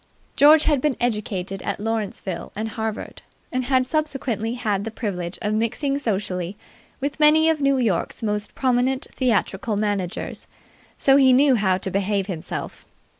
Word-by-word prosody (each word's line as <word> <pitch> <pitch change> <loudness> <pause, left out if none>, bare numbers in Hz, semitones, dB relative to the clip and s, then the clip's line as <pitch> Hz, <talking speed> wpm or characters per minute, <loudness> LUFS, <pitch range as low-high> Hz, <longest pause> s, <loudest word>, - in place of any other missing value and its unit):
George 300 +2 +7
had 295 -4 +2
been 295 -2 0
educated 200 -5 -2
at - - -3
Lawrenceville 205 -5 -3
and 220 +2 -3
Harvard, 220 0 -5 0.3
and 255 0 -1
had 255 0 +2
subsequently 260 -6 -1
had 210 -5 -1
the 225 - -4
privilege 190 -6 -4
of 210 0 0
mixing 245 +6 0
socially 195 -5 -2 0.4
with 280 +2 -3
many 315 +1 +6
of 310 -2 -2
New 275 -1 +3
York's 225 -2 -1
most 210 -1 -2
prominent 255 +1 +1
theatrical 225 -3 0
managers; 200 -3 -3 0.5
so 270 0 +5
he 265 -2 +6
knew 270 +2 +5
how 195 -5 +2
to 190 0 -5
behave 200 0 0
himself. 180 -5 -6
225 Hz, 150 wpm, -23 LUFS, 200-265 Hz, 0.5 s, George